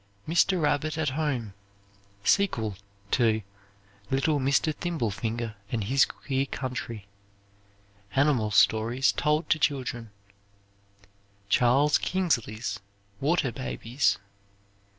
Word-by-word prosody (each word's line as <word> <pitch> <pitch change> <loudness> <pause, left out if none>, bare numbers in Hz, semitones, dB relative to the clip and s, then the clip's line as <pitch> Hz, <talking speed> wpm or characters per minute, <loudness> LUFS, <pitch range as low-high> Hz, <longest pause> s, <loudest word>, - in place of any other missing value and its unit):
"Mr. 175 +3 +3
Rabbit 150 +1 0
At 160 -2 +1
Home"; 130 -7 -2 0.7
sequel 110 - +2 0.4
to 110 -3 +2 0.7
"Little 145 +3 +1
Mr. 140 +3 +2
Thimblefinger 115 - -3 0.2
and 115 -3 -1
His 130 +6 +4
Queer 135 -1 -3
Country." 120 -6 -5 1.1
Animal 135 -6 +3
stories 115 +5 +3
told 150 +2 0
to 155 - +3
children. 125 -6 -1 1.4
Charles 135 +7 +4
Kingsley's 120 - -1 0.4
"Water 150 -2 +1
Babies." 130 +1 -1
135 Hz, 90 wpm, -27 LUFS, 115-150 Hz, 1.4 s, His